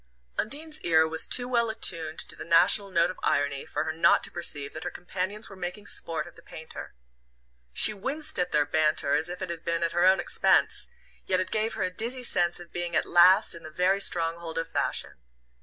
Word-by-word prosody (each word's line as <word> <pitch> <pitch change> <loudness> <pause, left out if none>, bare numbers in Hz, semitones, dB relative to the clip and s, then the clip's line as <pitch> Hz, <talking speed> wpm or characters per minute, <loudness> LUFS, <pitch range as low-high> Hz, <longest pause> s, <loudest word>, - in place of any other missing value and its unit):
Undine's 300 +7 -3
ear 160 -2 +3
was 160 0 -2
too 245 0 0
well 235 -2 +1
attuned 165 -8 0
to - - -2
the - - -8
national 180 +5 +4
note 170 -2 +2
of - - -13
irony 140 -1 -1
for - - -2
her 160 - -3
not 160 - +3
to - - +4
perceive 145 -5 -2
that 155 - -7
her - - -3
companions 190 +4 -5
were 195 - -12
making 185 +3 -6
sport 165 -5 -3
of 175 - -14
the - - -16
painter. 160 - -10 0.8
She 215 - +5
winced 270 +8 -3
at 180 0 0
their 150 -1 +3
banter 155 -1 +1
as 160 - +1
if 180 +1 -6
it 180 - -4
had 165 -1 -7
been 170 0 -1
at 165 - 0
her 175 +1 +2
own 190 +1 +5
expense, - - +2 0.4
yet 185 - +1
it 185 - -3
gave 220 +1 -1
her - - -2
a 185 0 -2
dizzy 240 +5 -2
sense 175 -7 +1
of 175 -1 -13
being 175 0 -4
at - - +2
last 185 +4 +5
in 170 - -9
the 155 - -10
very 180 +5 +1
stronghold 165 -2 -1
of 165 - -2
fashion. - - -2
175 Hz, 220 wpm, -27 LUFS, 165-200 Hz, 0.8 s, She